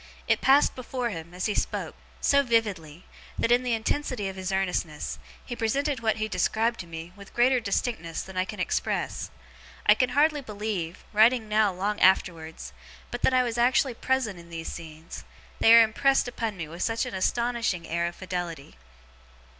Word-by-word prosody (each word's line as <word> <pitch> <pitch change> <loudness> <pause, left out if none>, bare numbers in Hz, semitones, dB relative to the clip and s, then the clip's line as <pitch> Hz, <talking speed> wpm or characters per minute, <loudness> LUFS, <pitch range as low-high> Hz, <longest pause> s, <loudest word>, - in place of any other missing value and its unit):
It - - +2
passed 275 +2 +5
before 250 -1 -3
him, 165 -2 -7
as 180 +1 -4
he 210 - +1
spoke, - - -2 0.3
so 280 0 +4
vividly, 200 - -1 0.3
that, 230 - +1
in 245 +1 +5
the 250 -2 -1
intensity 225 -1 -1
of 190 - -5
his 190 0 -4
earnestness, 160 - -2 0.3
he 240 - -5
presented 270 +4 0
what 225 -1 +1
he 215 0 -2
described 225 +2 0
to 175 - -7
me, 165 +1 -8
with 200 -1 -14
greater 250 +1 +4
distinctness 200 -6 -2
than 190 - -11
I 185 - +2
can 205 +2 -8
express. 185 - -2 0.6
I 210 - +8
can 250 +3 +1
hardly 300 0 +4
believe, 205 -7 -4
writing 220 +2 +4
now 215 -1 +3
long 200 +3 -2
afterwards, 165 -4 +1 0.4
but - - -4
that - - +4
I 255 - +5
was 240 -1 -2
actually 250 +2 +3
present 235 -6 -1
in 170 0 -14
these 165 -1 -6
scenes; 160 0 -9 0.4
they 225 - +6
are 230 - +9
impressed 270 +5 +2
upon 225 -4 -3
me 165 -3 -5
with 170 +3 -9
such 225 +2 0
an 250 - -6
astonishing 230 -3 -1
air 170 +1 0
of 170 - -6
fidelity. 175 - -5
210 Hz, 180 wpm, -27 LUFS, 175-240 Hz, 0.6 s, are